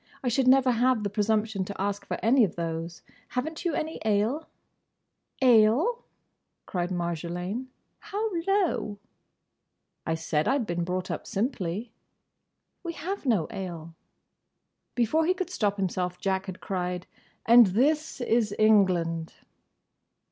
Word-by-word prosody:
I 250 Hz, -, +1 dB
should 255 Hz, +2 st, +1 dB
never 260 Hz, 0 st, +6 dB
have 245 Hz, -1 st, +2 dB
the 200 Hz, -, -2 dB
presumption 215 Hz, -1 st, 0 dB
to 200 Hz, -, -8 dB
ask 200 Hz, +1 st, -2 dB
for -, -, -2 dB
any 245 Hz, +2 st, +5 dB
of 195 Hz, -, 0 dB
those. 165 Hz, 0 st, -4 dB, 0.2 s
Have 250 Hz, +4 st, -2 dB
n't 320 Hz, 0 st, -7 dB
you 335 Hz, -4 st, +1 dB
any 315 Hz, +1 st, -3 dB
ale?" 220 Hz, +9 st, +1 dB, 1.0 s
"Ale!" 250 Hz, -, +4 dB, 0.6 s
cried 175 Hz, -1 st, -2 dB
Marjolaine, 175 Hz, +6 st, -3 dB, 0.3 s
"how 430 Hz, +1 st, -3 dB, 0.2 s
low!" 370 Hz, -, +1 dB, 1.1 s
"I 160 Hz, -, -1 dB
said 155 Hz, -1 st, -1 dB
I 275 Hz, -, +3 dB
'd 245 Hz, -, -2 dB
been 175 Hz, -2 st, -2 dB
brought 180 Hz, +1 st, -3 dB
up -, -, -5 dB
simply." 210 Hz, -1 st, -2 dB, 0.9 s
"We 340 Hz, -2 st, -5 dB
have 370 Hz, -2 st, -5 dB
no 210 Hz, -10 st, +3 dB
ale." 170 Hz, -4 st, -6 dB, 1.0 s
Before 305 Hz, +7 st, +2 dB
he 365 Hz, -, +3 dB
could 370 Hz, -1 st, -4 dB
stop 205 Hz, -, 0 dB
himself 180 Hz, -2 st, -2 dB
Jack 190 Hz, +1 st, -1 dB
had 185 Hz, -1 st, -7 dB
cried 180 Hz, -1 st, -3 dB, 0.4 s
"And 235 Hz, -1 st, +8 dB
this 285 Hz, +9 st, +1 dB
is 225 Hz, -3 st, +1 dB
England!" 180 Hz, -6 st, +2 dB
210 Hz, 135 wpm, -27 LUFS, 180-260 Hz, 1.1 s, And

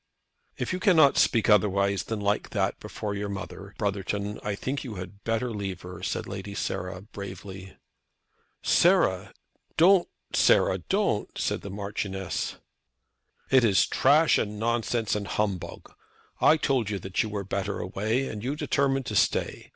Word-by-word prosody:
"If -, -, -2 dB
you 185 Hz, -, -2 dB
cannot 165 Hz, -8 st, +5 dB
speak 115 Hz, -3 st, +3 dB
otherwise 100 Hz, -2 st, +3 dB
than 110 Hz, -2 st, -3 dB
like 100 Hz, 0 st, 0 dB
that -, -, -1 dB
before 105 Hz, -1 st, -5 dB
your 100 Hz, 0 st, -3 dB
mother, 100 Hz, 0 st, -7 dB
Brotherton, 100 Hz, 0 st, -2 dB
I 105 Hz, -1 st, -2 dB
think 135 Hz, +6 st, -3 dB
you 115 Hz, -5 st, -6 dB
had 95 Hz, +2 st, -9 dB
better 115 Hz, +2 st, -1 dB
leave 100 Hz, -4 st, -4 dB
her," 90 Hz, 0 st, -9 dB
said -, -, -2 dB
Lady 100 Hz, +1 st, -7 dB
Sarah, 90 Hz, -1 st, -3 dB
bravely. 95 Hz, -2 st, -9 dB, 2.0 s
"Don't, 180 Hz, +2 st, +6 dB, 0.3 s
Sarah, -, -, +4 dB
don't!" -, -, -1 dB
said -, -, -1 dB
the 100 Hz, -, -7 dB
Marchioness. 100 Hz, -1 st, -3 dB, 1.0 s
"It 130 Hz, -2 st, +6 dB
is 100 Hz, -5 st, +4 dB
trash 155 Hz, +2 st, +4 dB
and 105 Hz, 0 st, -3 dB
nonsense, 115 Hz, 0 st, 0 dB
and 105 Hz, -1 st, -2 dB
humbug. 95 Hz, -5 st, -3 dB, 0.5 s
I 160 Hz, -, +5 dB
told 130 Hz, -7 st, 0 dB
you 105 Hz, -, -2 dB
that 95 Hz, 0 st, -2 dB
you 110 Hz, -, -2 dB
were 105 Hz, -1 st, -3 dB
better 100 Hz, +1 st, -3 dB
away, 110 Hz, +8 st, -1 dB
and 105 Hz, -1 st, -6 dB
you 135 Hz, +4 st, -2 dB
determined 135 Hz, -3 st, 0 dB
to 105 Hz, -, -4 dB
stay. -, -, 0 dB
105 Hz, 150 wpm, -27 LUFS, 100-115 Hz, 2.0 s, Don't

